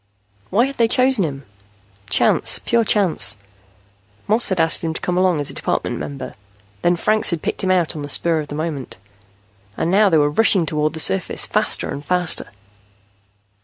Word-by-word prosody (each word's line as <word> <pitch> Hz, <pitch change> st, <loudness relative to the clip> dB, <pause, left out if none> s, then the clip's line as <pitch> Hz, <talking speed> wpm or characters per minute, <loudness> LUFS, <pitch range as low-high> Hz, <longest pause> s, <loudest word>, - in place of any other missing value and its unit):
Why 230 Hz, +6 st, +2 dB
had 275 Hz, +1 st, -7 dB
they 230 Hz, -, +3 dB
chosen 255 Hz, -2 st, +2 dB
him? 140 Hz, -4 st, -5 dB, 0.6 s
Chance, -, -, +2 dB
pure 235 Hz, -1 st, +2 dB
chance. 190 Hz, -, +3 dB, 0.9 s
Moss 220 Hz, +3 st, +4 dB
had 190 Hz, -3 st, -2 dB
asked 165 Hz, +1 st, +3 dB
him 160 Hz, -1 st, -3 dB
to -, -, -4 dB
come 180 Hz, -, -2 dB
along 180 Hz, -3 st, +1 dB
as 145 Hz, -, -2 dB
a -, -, -13 dB
Department -, -, -3 dB
member. 140 Hz, -1 st, -7 dB, 0.5 s
Then 175 Hz, -, +2 dB
Franks 215 Hz, +5 st, +1 dB
had 170 Hz, -3 st, -3 dB
picked -, -, -3 dB
him 190 Hz, -, -1 dB
out 180 Hz, -4 st, +1 dB
on 150 Hz, -, -6 dB
the 145 Hz, -, -7 dB
spur 165 Hz, +2 st, +1 dB
of 150 Hz, -, -6 dB
the 145 Hz, -, -7 dB
moment. 155 Hz, -4 st, -5 dB, 0.8 s
And 170 Hz, -, -1 dB
now 205 Hz, +1 st, +4 dB
they 165 Hz, -, +3 dB
were 145 Hz, -1 st, +2 dB
rushing 190 Hz, 0 st, +3 dB
toward 155 Hz, -1 st, -1 dB
the 160 Hz, -, -7 dB
surface, 95 Hz, -10 st, +1 dB
faster -, -, +1 dB
and 140 Hz, -, -6 dB
faster. 180 Hz, +2 st, 0 dB
170 Hz, 185 wpm, -19 LUFS, 150-200 Hz, 0.9 s, Moss